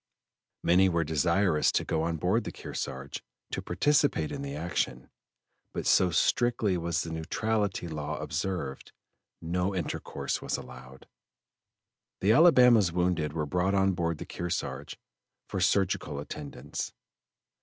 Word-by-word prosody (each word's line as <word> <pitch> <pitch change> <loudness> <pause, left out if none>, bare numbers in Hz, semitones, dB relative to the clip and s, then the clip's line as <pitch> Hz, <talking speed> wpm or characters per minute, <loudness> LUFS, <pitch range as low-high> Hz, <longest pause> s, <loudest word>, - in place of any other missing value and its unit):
Many 95 +2 +5
were 85 -1 +1
desirous 85 +2 +2
to - - +1
go 80 - 0
on 85 0 -1
board 95 +9 +1
the - - -5
Kearsarge 65 +1 -6 0.3
to - - -2
participate 145 - +2
in 140 - -4
the 140 0 -5
action, 75 -7 -2 0.6
but - - -3
so 90 - +5
strictly 115 +2 +2
was 85 -2 -1
the 85 - -6
neutrality 100 +4 -1
law 75 -1 -4
observed, 75 -2 -4 0.5
no 90 +3 -1
intercourse 90 -5 -3
was - - -2
allowed. 65 0 -11 1.1
The 100 - +3
Alabama's 125 - +6
wounded 85 -4 0
were 80 -2 -1
brought 90 +6 +1
on 95 0 +3
board 85 -3 -1
the - - -7
Kearsarge 85 -1 -4 0.5
for 95 - -3
surgical 95 -6 +1
attendance. 75 0 -6
90 Hz, 130 wpm, -29 LUFS, 80-100 Hz, 1.1 s, Alabama's